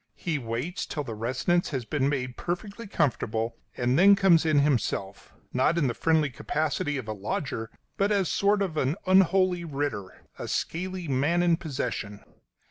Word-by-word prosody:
He 160 -5 -2
waits 120 +8 -4
till 150 - -3
the 120 -5 -6
residence 130 +11 0
has 130 -6 -3
been 140 +1 0
made 130 -3 -2
perfectly 200 +5 -5
comfortable, 115 - -1 0.2
and 125 +3 +2
then 200 +2 +8
comes 170 -5 +4
in 155 -2 +3
himself; 120 -8 0 0.2
not 130 +6 +2
in 160 - +2
the 120 - +1
friendly 155 +1 +2
capacity 150 +2 -1
of 125 -5 -6
a 110 - -2
lodger, 110 +2 -3 0.3
but 200 +1 +2
as 195 -3 +2
a - - -2
sort 200 0 +2
of 165 -5 -4
unholy 185 +4 +3
writter 140 - -4
a - - -5
scaly 185 +1 -3
man 145 +6 +2
in 170 -1 +4
possession. 125 - -4
150 Hz, 165 wpm, -27 LUFS, 125-175 Hz, 0.3 s, then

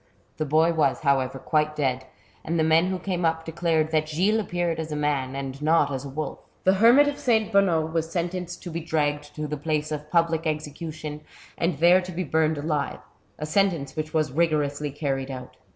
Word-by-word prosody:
The 155 - -1
boy 160 +3 +3
was, 155 -1 +1
however, 135 -3 +1
quite 150 +3 0
dead, 130 -3 -1 0.4
and 165 +2 -1
the 160 - +3
men 160 +2 +4
who 185 0 -1
came 180 -1 -3
up 160 0 0
declared 165 -1 0
that 155 -1 +1
Gilles 190 +8 +2
appeared 175 -5 -1
as 160 -1 -4
a - - -2
man 140 -3 -1
and 135 0 -5
not 155 -2 +3
as 135 -1 -3
a - - -6
wolf. 145 +1 -4 0.2
The 190 - +5
hermit 235 +8 +6
of 290 - -2
S. 220 -2 +3
Bonnot 170 -6 +2
was 165 0 -1
sentenced 175 0 -3
to 175 - -6
be 165 - -3
dragged 150 -2 -1
to 155 - -3
the 150 0 -3
place 155 0 -2
of 150 0 -5
public 165 -1 +1
execution, 155 0 -5 0.3
and 170 -3 -1
there 175 +4 +6
to 180 0 -7
be 180 +1 -3
burned 160 0 +1
alive, 150 -1 -2 0.4
a 150 - -4
sentence 165 -5 0
which 155 0 -3
was 155 -3 0
rigorously 150 -1 0
carried 135 -2 -3
out. 130 -1 -8
155 Hz, 200 wpm, -25 LUFS, 145-170 Hz, 0.4 s, hermit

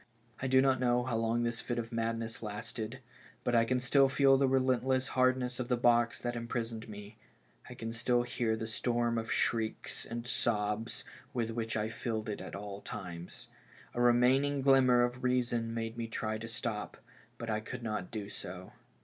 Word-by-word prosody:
I 130 - 0
do 130 0 +5
not 135 -2 +3
know 125 -1 +3
how 125 -2 -2
long 115 +1 +1
this 120 0 -1
fit 120 - -3
of 115 0 -3
madness 115 0 -2
lasted, 110 +3 -5 0.4
but 120 - 0
I 115 -1 +5
can 125 +2 +1
still 135 +2 +4
feel 135 0 +5
the 135 0 +3
relentless 130 0 +2
hardness 130 -1 +2
of 125 - -2
the 125 -1 +2
box 120 0 +3
that 120 0 -2
imprisoned 115 -1 -4
me; 105 +1 -9 0.5
I - - -8
can 115 0 -5
still 120 +1 +2
hear 120 -2 0
the 110 - -4
storm 120 +1 0
of 110 -1 -4
shrieks 110 -2 0
and 120 0 -5
sobs 110 -2 -1 0.3
with 115 -2 0
which 115 -1 -2
I 110 0 -1
filled 110 -1 -3
it 105 - -4
at - - -7 0.3
times; 85 -2 -7 0.4
a 120 - -1
remaining 130 +4 +4
glimmer 130 -3 +6
of 120 +1 -2
reason 120 -2 +1
made 115 0 -3
me 115 -1 -2
try 110 -1 -2
to 115 - -6
stop, 110 -2 -3 0.4
but 115 -1 -4
I 110 - +1
could 120 +3 -7
not 105 -5 -3
do 105 -3 -5
so. 90 -2 -7
120 Hz, 185 wpm, -32 LUFS, 115-125 Hz, 0.5 s, glimmer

